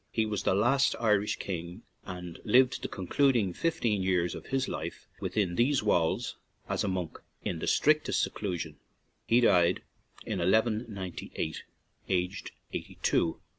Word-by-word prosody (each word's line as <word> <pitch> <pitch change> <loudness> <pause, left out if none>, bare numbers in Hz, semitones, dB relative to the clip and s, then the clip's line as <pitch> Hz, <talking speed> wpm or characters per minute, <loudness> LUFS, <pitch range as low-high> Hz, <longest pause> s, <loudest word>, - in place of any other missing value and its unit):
He 110 - +1
was 105 -2 -2
the - - +2
last 130 +7 +3
Irish 105 -3 +2
king, 85 -2 -5 0.2
and 90 -2 -7
lived 125 +4 +4
the - - -2
concluding 110 0 +1
fifteen 115 - 0
years 90 -2 +1
of - - -8
his 135 0 0
life - - -5
within 100 -5 0
these 125 +5 +2
walls 85 -6 +1 0.3
as - - -1
a - - 0
monk, 90 -4 -3 0.2
in 85 - -2
the - - -3
strictest 155 0 +3
seclusion; 85 -7 -3 0.5
he 120 +2 +5
died 90 -6 +4 0.4
in 100 - -2
1 90 +2 +2
198, 105 -8 -1 0.5
aged 90 +1 -1 0.2
eighty - - -6
two. 80 - +2
100 Hz, 145 wpm, -30 LUFS, 90-115 Hz, 0.5 s, he